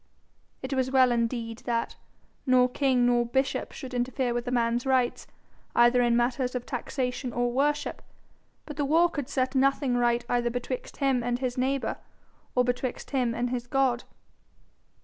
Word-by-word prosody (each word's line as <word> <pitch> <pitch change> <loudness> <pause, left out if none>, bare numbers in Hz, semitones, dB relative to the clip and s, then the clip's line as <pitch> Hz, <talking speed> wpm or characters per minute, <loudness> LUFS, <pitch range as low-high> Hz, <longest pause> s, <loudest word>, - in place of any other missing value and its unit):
It 265 +1 -3
was 260 -1 +1
well 260 -1 +4
indeed 230 -1 -1
that 230 -1 -1 0.5
nor 255 -1 +5
king 255 -1 +2
nor 240 0 +3
bishop 265 +3 -1
should 260 -3 -8
interfere 245 0 -1
with 240 +1 -3
a - - -1
man's 235 -1 +1
rights, 260 -2 +1 0.5
either 240 +1 +5
in 240 -1 +3
matters 250 +1 0
of 245 - -3
taxation 250 0 -3
or 245 +1 0
worship, 290 +3 0 0.6
but 295 -2 -8
the 295 - 0
war 335 +4 +4
could 285 -5 -4
set 260 -1 0
nothing 275 -1 +2
right 240 0 +1
either 240 -1 +1
betwixt 250 - -5
him 270 -3 +2
and 240 0 -1
his 250 -1 -2
neighbour, 265 +1 -1 0.6
or 250 - +4
betwixt 245 +1 -3
him 250 -4 0
and 245 +1 -1
his 245 -1 -3
God. 260 -2 +1
250 Hz, 165 wpm, -27 LUFS, 240-265 Hz, 0.6 s, nor